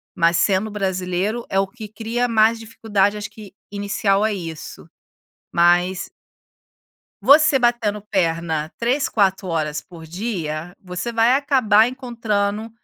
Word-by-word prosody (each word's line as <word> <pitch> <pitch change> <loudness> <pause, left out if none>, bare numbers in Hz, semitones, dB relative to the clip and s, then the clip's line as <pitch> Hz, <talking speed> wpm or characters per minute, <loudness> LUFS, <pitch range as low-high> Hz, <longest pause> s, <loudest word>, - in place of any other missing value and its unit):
mas 170 -1 +3
sendo 200 +3 +1
brasileiro 190 +3 -2
é 195 - +1
o 195 - +1
que 215 +2 -10
cria 230 +3 -2
mais 225 0 +3
dificuldade 210 -2 0
acho 210 - -6
que 210 -3 -13 0.2
inicial 200 0 0
a 220 - +1
isso. 165 -5 -8 0.6
Mas 175 +2 +2 1.1
você 300 0 +6
batendo 240 -4 0
perna 165 -5 -1
3, 255 +5 0
4 190 -2 +1
horas 155 -3 -2
por 170 -3 -13
dia, 175 -3 -4
você 180 +4 -5
vai 230 +2 +3
acabar 250 -6 +3
encontrando 225 -4 -2
205 Hz, 125 wpm, -21 LUFS, 180-225 Hz, 1.1 s, você